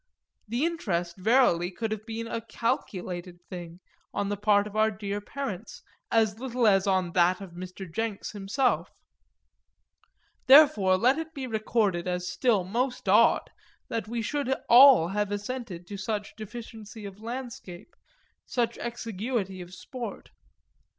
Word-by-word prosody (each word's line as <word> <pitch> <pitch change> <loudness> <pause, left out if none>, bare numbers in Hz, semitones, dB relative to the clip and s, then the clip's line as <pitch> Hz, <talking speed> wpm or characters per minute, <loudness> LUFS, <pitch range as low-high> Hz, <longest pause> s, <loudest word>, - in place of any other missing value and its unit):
The 240 +8 0
interest 175 - -2
verily 185 -4 +3
could 220 +4 -4
have 215 +1 -5
been 225 0 -4
a 230 0 -4
calculated 185 -6 -3
thing 175 -1 -8 0.3
on 200 - -1
the 205 - -1
part 205 0 +3
of 210 0 -9
our 215 0 +4
dear 205 -1 -4
parents 225 -4 -6 0.3
as 220 -1 +2
little 250 -2 -1
as 195 -2 +4
on 185 -2 +1
that 180 +1 +3
of 195 -3 -9
Mr. 185 +2 -8
Jenks 210 +4 -3
himself. 210 +6 0 1.6
Therefore 235 -10 +7
let 255 +9 +3
it 320 0 -7
be 270 -2 -4
recorded 215 -6 0
as 180 0 -2
still 225 -5 +2
most 245 +7 -2
odd - - +4 0.4
that 230 -1 -3
we 230 0 -3
should 285 +2 -2 0.2
all 245 -8 +8
have 205 +1 -1
assented 205 -4 -5
to 200 +2 -7
such 210 0 -3
deficiency 220 0 -9
of 200 +1 -9
landscape, 235 - -7 0.5
such 235 -2 -1
exiguity 225 -4 -3
of 175 0 -10
sport. 230 +3 -8
210 Hz, 140 wpm, -27 LUFS, 190-235 Hz, 1.6 s, all